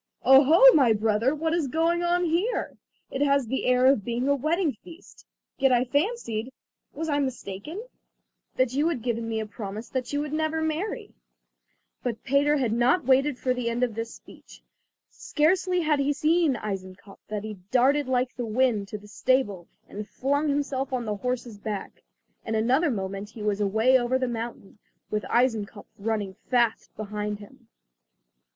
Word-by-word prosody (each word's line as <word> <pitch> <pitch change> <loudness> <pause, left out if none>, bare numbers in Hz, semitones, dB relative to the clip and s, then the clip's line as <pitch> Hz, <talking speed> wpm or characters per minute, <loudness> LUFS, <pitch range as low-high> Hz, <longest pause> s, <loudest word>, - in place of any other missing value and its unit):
"Oh, 270 +2 +8
ho, 325 - +6
my 260 -7 +5
brother! 220 +5 +1
what 320 +1 -1
is 335 -4 0
going 330 +5 +1
on 350 +1 +1
here? 350 +9 -1 0.4
It 270 - -3
has 280 -2 +3
the 265 +3 -2
air 250 0 +4
of 265 -6 +4
being 240 +4 -2
a 280 - +4
wedding 310 +4 0
feast. 345 +1 -15 0.3
Yet 270 -1 +4
I 245 0 +4
fancied—was 285 - -4
I 290 -2 +1
mistaken?—that 260 - -5
you 290 +4 +2
had 255 -9 -3
given 230 -2 -2
me 220 -1 -1
a 220 - -3
promise 210 +1 -7
that 255 -2 -3
you 290 +1 -1
never 315 +2 -1
would - - 0
marry." 320 +7 -4 0.9
But 235 -3 -4
Peter 285 +2 +2
had 245 -5 0
not 245 +7 +2
waited 270 +1 +3
for 255 0 0
the 250 -2 -2
end 235 +2 -1
of 240 -3 0
this 230 +1 -5
speech. - - -16 0.5
Scarcely 360 +3 +1
had 305 -3 +1
he 280 +1 +1
seen 310 -1 +2
Eisenkopf 195 -1 -7
than 210 -1 -4
he 215 -1 -6
darted 270 +3 +3
like 255 0 0
the 245 - -3
wind 220 -3 +1
to 210 - -6
the 210 0 -15
stable 215 -4 0 0.2
and 210 +1 -7
flung 285 +6 0
himself 280 -2 -1
on 250 -2 -2
the 210 -1 -2
horse's 245 -2 -4
back. 205 -1 -6 0.4
In 225 - -3
another 255 +9 +2
moment 195 -3 -4
he 215 -1 -9
was 210 -1 0
away 220 +6 +3
over 245 +1 +1
the 260 -1 -1
mountain, 230 -3 -6 0.3
with 210 0 -1
Eisenkopf 225 -4 0
running 205 -2 -2 0.2
fast 240 -3 +1
behind 210 0 -4
him. 230 +4 -16
255 Hz, 170 wpm, -26 LUFS, 220-290 Hz, 0.9 s, Oh